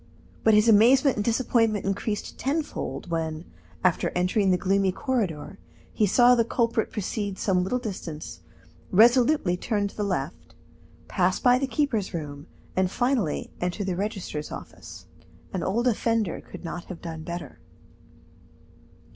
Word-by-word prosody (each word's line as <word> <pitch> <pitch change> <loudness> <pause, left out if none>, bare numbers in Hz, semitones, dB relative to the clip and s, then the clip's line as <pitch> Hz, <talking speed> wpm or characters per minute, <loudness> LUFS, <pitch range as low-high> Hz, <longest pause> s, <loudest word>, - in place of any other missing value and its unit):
But 220 -1 +5
his 210 +2 +4
amazement 245 +5 +5
and 205 - 0
disappointment 225 -2 +1
increased 205 +2 -3
tenfold 285 - -3
when, 160 0 -2 0.4
after 180 -3 +2
entering 185 +3 +2
the 180 - +4
gloomy 195 +1 +2
corridor, 200 - -2 0.3
he 210 - +2
saw 245 +5 +6
the 235 -2 +4
culprit 230 -1 0
proceed 205 -1 -3
some 185 -3 +1
little 220 +7 0
distance, 185 -10 -6 0.5
resolutely 235 - +4
turn 205 0 -1
to - - -17
the - - -4
left, 200 -2 -4 0.5
pass 185 -1 +1
by 250 0 +4
the 275 - -1
keeper's 245 - -1
room, 145 -1 -6 0.3
and 185 -1 +2
finally 240 - 0
enter 180 +3 -2
the 190 -2 -2
registrar's 190 -6 -4
office. - - -10 0.5
An 185 - -2
old 225 +8 0
offender 225 -5 0
could - - -11
not 170 +1 -5
have 180 - -9
done 165 -2 -6
better. 170 -3 -7
200 Hz, 140 wpm, -26 LUFS, 180-235 Hz, 0.5 s, saw